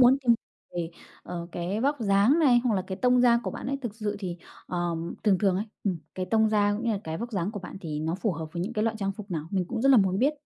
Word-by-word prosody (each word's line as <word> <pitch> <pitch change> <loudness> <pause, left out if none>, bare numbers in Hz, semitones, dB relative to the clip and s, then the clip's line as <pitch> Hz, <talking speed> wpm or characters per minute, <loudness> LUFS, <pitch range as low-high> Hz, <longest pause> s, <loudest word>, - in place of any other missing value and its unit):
muốn 255 +2 +7
tìm 245 -4 +4 0.4
về, 170 -2 -2 0.3
ờ, 170 -1 -5
cái 180 +5 -2
vóc 285 +4 +2
dáng 205 +7 +4
này 265 -7 +6
hoặc 235 - +2
là 190 - 0
cái 190 - -4
tông 250 +2 +4
da 235 -1 +5
của 190 - -3
bạn - - -6
ấy. 275 +1 -1
Thực 235 -5 -4
sự 210 -2 -3
thì, 180 -4 -4 0.3
ờ, 175 -1 -1 0.3
thường 200 -4 +4
thường 195 -2 +2
ấy, 205 - -1 0.2
ừm, 185 -5 0 0.2
cái 185 -1 -3
tông 220 +3 +3
da 205 -1 +3
cũng 220 +3 -4
như 230 - +2
là 205 - -1
cái 160 0 -3
vóc 235 +1 -5
dáng 190 -1 -1
của 205 -2 -6
bạn 180 - -8
thì 150 -4 -4
nó 160 +2 -1
phù 200 +2 -1
hợp 160 -1 -5
với 175 0 -2
những 215 - -3
cái 215 -1 0
loại 225 -1 0
trang 195 -1 -1
phục 205 0 -10
nào? 160 -3 -3
Mình 190 -2 0
cũng 235 -1 -2
rất 270 - +4
là 270 - +8
muốn 190 -2 +3
biết. 275 +5 +3
205 Hz, 300 wpm, -27 LUFS, 180-235 Hz, 0.4 s, là